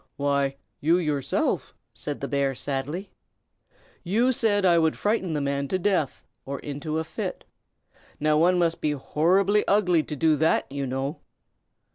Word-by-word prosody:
"Why, 140 -1 0 0.2
you 165 +4 +3
yourself," 150 -6 -1 0.2
said 145 -1 -5
the 140 - -2
bear, 140 -1 0
sadly. 145 +9 -4 0.9
"You 225 +8 +2
said 205 -5 +1
I 170 -2 +5
would 160 -1 +1
frighten 205 -5 0
the 150 - 0
man 140 0 -1
to 185 - 0
death, 185 -7 0 0.2
or 140 0 -5
into 145 +3 -4
a 160 - 0
fit. 160 - -5 0.8
Now, 155 0 +2
one 175 +4 +4
must 170 -1 +1
be 150 - +1
horribly 185 +9 +2
ugly 180 -5 +3
to 150 - -6
do 155 +2 +3
that, 160 +3 +2
you 140 -1 -3
know." 135 +4 -3
155 Hz, 155 wpm, -26 LUFS, 140-180 Hz, 0.9 s, I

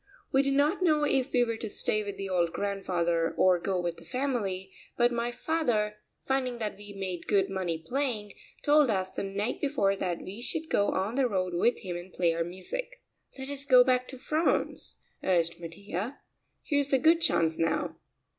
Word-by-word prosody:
We 270 - +5
did 275 0 +1
not 300 +7 +2
know 310 -4 +3
if 270 -2 +1
we 245 -1 +4
were 230 -1 -2
to 220 - -5
stay 215 +1 0
with 200 -1 -6
the 195 - -4
old 175 -3 +1
grandfather 175 -4 0
or 185 -1 +5
go 185 +1 -1
with 175 -1 -2
the 170 - -13
family, 195 - -2 0.3
but 240 0 +4
my 235 0 -1
father, 240 -7 0 0.3
finding 260 -2 0
that 215 -3 -3
we 205 0 -11
made 190 -3 -5
good 195 -2 +2
money 180 -4 -1
playing, 215 - -2 0.3
told 295 -2 +5
us 190 -3 0
the - - -4
night 200 +3 -2
before 240 -9 +2
that 180 -3 -3
we 200 +5 -7
should 320 +5 -3
go 205 - +3
on 195 +4 -1
the 260 0 +2
road 185 -3 -1
with 230 +8 +2
him 180 -4 -4
and 175 +2 -9
play 170 -2 +1
our 165 0 0
music. 190 - -6 0.3
"Let 265 +1 -6
us 280 -1 -3
go 255 -3 +7
back 250 0 +1
to 260 - -8
France," 305 +6 0 0.3
urged 170 -2 +1
Mattia; 190 +8 -5 0.5
"here's 285 -2 +1
a 270 - +5
good 325 +4 +4
chance 165 - +2
now." 165 0 0
210 Hz, 195 wpm, -29 LUFS, 185-265 Hz, 0.5 s, go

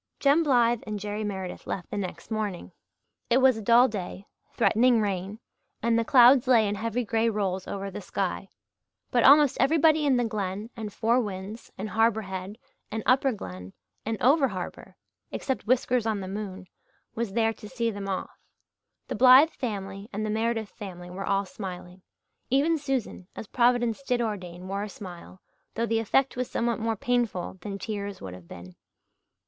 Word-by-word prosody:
Jem 285 +4 +4
Blythe 240 -6 +3
and 210 -1 -3
Jerry 210 +1 -4
Meredith 190 -3 -5
left 180 - -5
next 185 -1 -5
morning. 210 -5 -3 0.6
It 240 - +4
was 260 -1 +5
a - - -5
dull 235 +4 +6
day, 195 -2 -6 0.3
threatening 240 +1 +4
rain, 200 -1 -2 0.5
and 230 0 +3
the - - +1
clouds 250 +1 +6
lay 230 -4 +5
in 200 - -1
heavy 230 +4 -2
grey 225 +1 +1
rolls 190 -4 -2
over 195 0 -4
the - - -7
sky; - - -3 0.6
but 240 -2 +3
almost 290 -1 +6
everybody 310 +3 +4
in 265 -3 +4
the 245 - +1
Glen 210 0 -4
and 220 -3 -6
Four 230 +4 +2
Winds 205 +1 -7
and 210 +3 -4
Harbour 225 0 +2
Head 190 +1 -6 0.3
and 220 0 -4
Upper 265 +1 +3
Glen 90 - -8 0.3
and 225 0 -3
over 275 +3 +5
harbour 185 -6 -7 0.3
except 265 -5 -3
Whiskers 250 -1 +2
on 215 -2 0
the 190 - -6
moon 195 -1 -6 0.5
was 230 -4 -3
there 225 0 +2
to 210 0 -12
see 235 -2 -1
them 200 -1 -6
off. 190 - -4 0.7
The - - -3
Blythe 260 +5 +7
family 200 -3 -5
and 215 +2 -3
the 215 - -2
Meredith 225 -1 -1
family 180 -4 -9
were 195 +2 -5
all 200 0 +1
smiling. 185 -1 -8 0.5
Even 305 +5 +2
Susan, 265 -10 -3
as - - -7
Providence 240 +1 +2
did 250 -3 0
ordain, 185 -6 -4
wore 195 +1 -3
a 210 - -4
smile, 185 -1 -11 0.3
though 230 - 0
the 225 0 +1
effect 260 +5 +1
was 250 0 -3
somewhat 235 0 -1
more 225 0 -1
painful 220 -6 -1
than 200 +1 -5
tears 200 -2 -5
would 95 -1 -8
have 90 -2 -12
been. 90 +2 -11
215 Hz, 175 wpm, -27 LUFS, 195-240 Hz, 0.7 s, Blythe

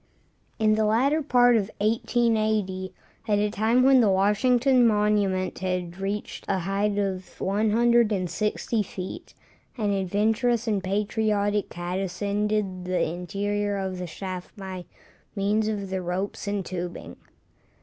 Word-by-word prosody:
In 215 -1 +3
the 215 0 +2
latter 265 +9 +2
part 245 -4 +4
of 210 -2 +1
1880, 215 -4 0 0.4
at 210 -1 +2
a 210 0 +1
time 225 +4 +2
when 265 -1 +6
the 215 - +4
Washington 240 +6 +3
monument 210 -3 +1
had 180 -2 -2
reached 200 +2 -4
a - - +1
height 200 +3 -1
of 190 -2 -3
160 215 0 +1
feet, 185 -2 -7 0.4
an 210 -3 0
adventurous 215 +5 +1
and 205 -4 0
patriotic 205 +1 0
cat 175 +2 -4
ascended 200 0 -2
the 180 0 0
interior 200 +4 -2
of 190 -1 -3
the 180 - -4
shaft 185 +4 -7
by 190 -2 -7 0.5
means 210 +2 +1
of 200 -3 -3
the 190 -1 -1
ropes 185 +4 -3
and 200 -2 -2
tubing. 175 -1 -6
205 Hz, 130 wpm, -25 LUFS, 190-220 Hz, 0.5 s, when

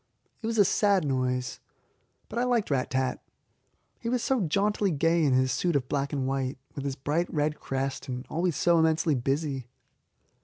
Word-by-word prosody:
It 225 - -3
was 225 0 -1
a 205 - +6
sad 200 -3 +3
noise, 130 -2 -1 0.7
but 230 - -3
I - - +2
liked 240 -8 +1
Rat 130 -2 +1
tat. 130 -2 -1 0.8
He 230 - -3
was 250 -1 0
so 265 -3 +1
jauntily 200 +4 +1
gay 165 +1 +2
in 140 -3 +3
his 130 0 +3
suit 170 +5 0
of 130 -3 0
black 140 0 -1
and 135 -2 -1
white, 135 0 -1 0.2
with 140 - -5
his 135 -1 -2
bright 155 +6 -1
red 150 0 0
crest, 135 0 -3
and 125 0 -4
always 170 0 0
so 170 -1 +3
immensely 160 0 +3
busy. 135 0 -1
150 Hz, 185 wpm, -28 LUFS, 135-180 Hz, 0.8 s, a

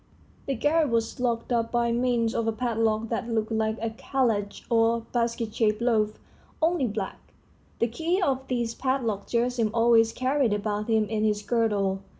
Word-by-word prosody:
The 275 - 0
garret 295 +5 +2
was 230 0 -1
locked 235 -1 -1
up 230 -1 +1
by 235 -1 +1
means 235 -1 +1
of 230 - -1
a - - +3
padlock 225 -1 0
that 230 0 -2
looked 220 -1 -1
like 220 0 0
a 225 0 -2
kalatch 225 -4 -1
or 230 0 +2
basket 230 -1 -2
shaped 215 -2 +1
loaf, 220 -3 +1 0.4
only 325 -4 +2
black; 205 -2 -4 0.6
the - - +2
key 330 - -1
of 270 -7 0
this 240 -2 -1
padlock 240 -7 -1
Gerasim 235 -1 +1
always 230 -1 +4
carried 255 -2 +1
about 210 0 -2
him 220 -1 +3
in 215 0 -2
his 210 -1 +1
girdle. 205 -5 +1
230 Hz, 165 wpm, -26 LUFS, 220-245 Hz, 0.6 s, always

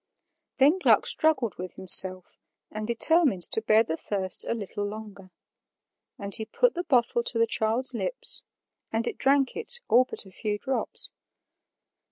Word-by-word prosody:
Then 290 +7 +3
Gluck - - +3
struggled 265 - 0
with 185 0 -7
himself 185 -1 +5 0.4
and 215 0 -6
determined 240 - +3
to 220 - -1
bear 220 0 +3
the 160 -7 -4
thirst 190 +1 -4
a - - -2
little 205 -1 -6
longer; 205 -2 -9 0.9
and 200 -1 -7
he 220 - 0
put 485 - 0
the 350 - -4
bottle 240 -5 +1
to 235 - -4
the 230 - +3
child's 225 +4 -1
lips, - - -3 0.5
and 225 +1 -2
it - - -6
drank 275 0 +1
it 465 +1 -4
all 250 +2 +4
but 255 - -7
a 190 - -15
few 210 +2 -4
drops. 265 +5 -4
225 Hz, 160 wpm, -25 LUFS, 205-265 Hz, 0.9 s, himself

